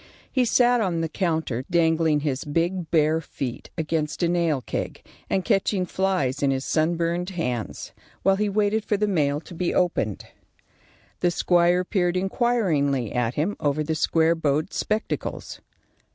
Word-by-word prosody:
He 255 Hz, -2 st, +2 dB
sat 245 Hz, 0 st, +4 dB
on 175 Hz, -5 st, 0 dB
the 165 Hz, -, 0 dB
counter 160 Hz, -, -1 dB
dangling 160 Hz, -3 st, +2 dB
his 140 Hz, -3 st, -2 dB
big 170 Hz, +3 st, -1 dB
bare 160 Hz, 0 st, +3 dB
feet 130 Hz, -5 st, -6 dB
against 160 Hz, +1 st, -2 dB
a -, -, +4 dB
nail 170 Hz, -4 st, +1 dB
keg, -, -, -5 dB, 0.2 s
and 190 Hz, -, 0 dB
catching 195 Hz, -3 st, +1 dB
flies 180 Hz, -8 st, 0 dB
in 140 Hz, -, +3 dB
his 135 Hz, 0 st, -1 dB
sunburned 170 Hz, +2 st, 0 dB
hands, 125 Hz, -, -4 dB, 0.3 s
while 195 Hz, 0 st, +4 dB
he 210 Hz, 0 st, 0 dB
waited 210 Hz, +1 st, +1 dB
for 210 Hz, -, 0 dB
the 210 Hz, +1 st, +1 dB
mail 145 Hz, -7 st, +1 dB
to 175 Hz, -, -12 dB
be 175 Hz, +1 st, -1 dB
opened. 110 Hz, -, 0 dB, 0.9 s
The 175 Hz, -, +2 dB
squire 175 Hz, +1 st, +3 dB
peered 180 Hz, -2 st, 0 dB
inquiringly 180 Hz, -, +1 dB
at 120 Hz, 0 st, 0 dB
him 170 Hz, +8 st, 0 dB
over 150 Hz, 0 st, 0 dB
the 160 Hz, +1 st, -1 dB
square 160 Hz, +1 st, +2 dB
bowed 155 Hz, +1 st, -1 dB
spectacles. 215 Hz, +1 st, -3 dB
170 Hz, 150 wpm, -24 LUFS, 150-190 Hz, 0.9 s, sat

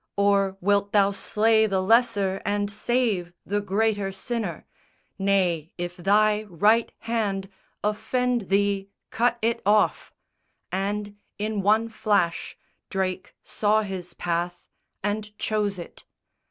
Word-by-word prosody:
Or 200 Hz, -1 st, +2 dB
wilt 200 Hz, +1 st, +1 dB
thou 200 Hz, -1 st, +4 dB
slay 220 Hz, +2 st, +2 dB
the 195 Hz, -2 st, 0 dB
lesser 200 Hz, -2 st, +2 dB
and 205 Hz, 0 st, -1 dB
save 215 Hz, -5 st, 0 dB
The 205 Hz, +1 st, -1 dB
greater 205 Hz, 0 st, 0 dB
sinner? 200 Hz, -3 st, -4 dB, 0.5 s
Nay, 180 Hz, -5 st, +1 dB
if 175 Hz, 0 st, -4 dB
thy 210 Hz, +4 st, +3 dB
right 215 Hz, +7 st, +3 dB
hand 205 Hz, -4 st, -2 dB, 0.3 s
Offend 240 Hz, +1 st, 0 dB
thee, 200 Hz, 0 st, +1 dB, 0.2 s
cut 240 Hz, +1 st, +1 dB
it 230 Hz, +1 st, +1 dB
off!_" 210 Hz, +2 st, +2 dB, 0.6 s
And, 205 Hz, +2 st, -2 dB, 0.2 s
in 210 Hz, 0 st, -2 dB
one 215 Hz, +3 st, +3 dB
flash, 205 Hz, -6 st, 0 dB, 0.3 s
Drake 190 Hz, -1 st, -3 dB
saw 215 Hz, +1 st, +1 dB
his 185 Hz, -3 st, -6 dB
path 175 Hz, +1 st, -2 dB, 0.4 s
and 210 Hz, +1 st, -3 dB
chose 210 Hz, -2 st, -1 dB
it. 170 Hz, -, -10 dB
205 Hz, 115 wpm, -25 LUFS, 195-215 Hz, 0.6 s, thou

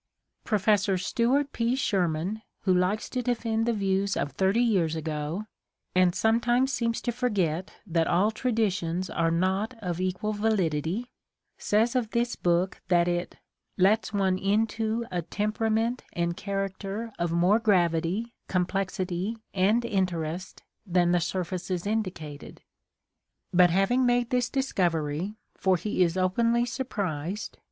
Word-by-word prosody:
Professor 205 Hz, -2 st, +2 dB
Stuart 255 Hz, +9 st, +1 dB
P. 235 Hz, +2 st, +1 dB
Sherman, 190 Hz, -, 0 dB, 0.2 s
who 190 Hz, -, +2 dB
likes 185 Hz, +4 st, +1 dB
to 255 Hz, -, -2 dB
defend 230 Hz, -2 st, 0 dB
the -, -, +3 dB
views 195 Hz, -1 st, 0 dB
of 145 Hz, -, -1 dB
thirty 195 Hz, +5 st, +2 dB
years 180 Hz, -9 st, +2 dB
ago 155 Hz, +4 st, -3 dB, 0.5 s
and 185 Hz, -1 st, +3 dB
sometimes 240 Hz, +4 st, +2 dB
seems 230 Hz, -1 st, 0 dB
to 240 Hz, -, -1 dB
forget 190 Hz, -9 st, -1 dB
that 165 Hz, -3 st, +1 dB
all 195 Hz, +5 st, +3 dB
traditions 195 Hz, -7 st, -1 dB
are 165 Hz, 0 st, +1 dB
not 190 Hz, +7 st, 0 dB
of 180 Hz, -3 st, -3 dB
equal 185 Hz, +4 st, -1 dB
validity, 205 Hz, -, 0 dB, 0.5 s
says 225 Hz, +4 st, +2 dB
of 240 Hz, -4 st, +1 dB
this 235 Hz, +1 st, 0 dB
book 175 Hz, +1 st, 0 dB
that 175 Hz, -1 st, +3 dB
it 175 Hz, 0 st, -2 dB, 0.4 s
"lets 205 Hz, +5 st, +3 dB
one 190 Hz, -2 st, +1 dB
into 220 Hz, +3 st, 0 dB
a 180 Hz, -1 st, -1 dB
temperament 220 Hz, +5 st, -1 dB
and 170 Hz, 0 st, -1 dB
character 195 Hz, +3 st, -4 dB
of 170 Hz, -1 st, 0 dB
more 180 Hz, +6 st, +4 dB
gravity, 185 Hz, +2 st, +1 dB
com 180 Hz, -1 st, +1 dB
plexity 190 Hz, +1 st, -2 dB, 0.2 s
and 210 Hz, +5 st, +2 dB
interest 185 Hz, -4 st, -2 dB, 0.2 s
than 175 Hz, -3 st, +2 dB
the 175 Hz, -, +3 dB
surfaces 180 Hz, +1 st, -3 dB
indicated." 180 Hz, -9 st, -4 dB, 0.9 s
But 180 Hz, 0 st, +6 dB
having 195 Hz, +8 st, +2 dB
made 245 Hz, -1 st, +1 dB
this 250 Hz, -1 st, +1 dB
discovery, 175 Hz, -, -1 dB, 0.2 s
for 190 Hz, -1 st, +2 dB
he 205 Hz, +1 st, -2 dB
is 175 Hz, 0 st, +2 dB
openly 230 Hz, +6 st, +2 dB
surprised. 200 Hz, -, -4 dB
195 Hz, 130 wpm, -27 LUFS, 175-225 Hz, 0.9 s, But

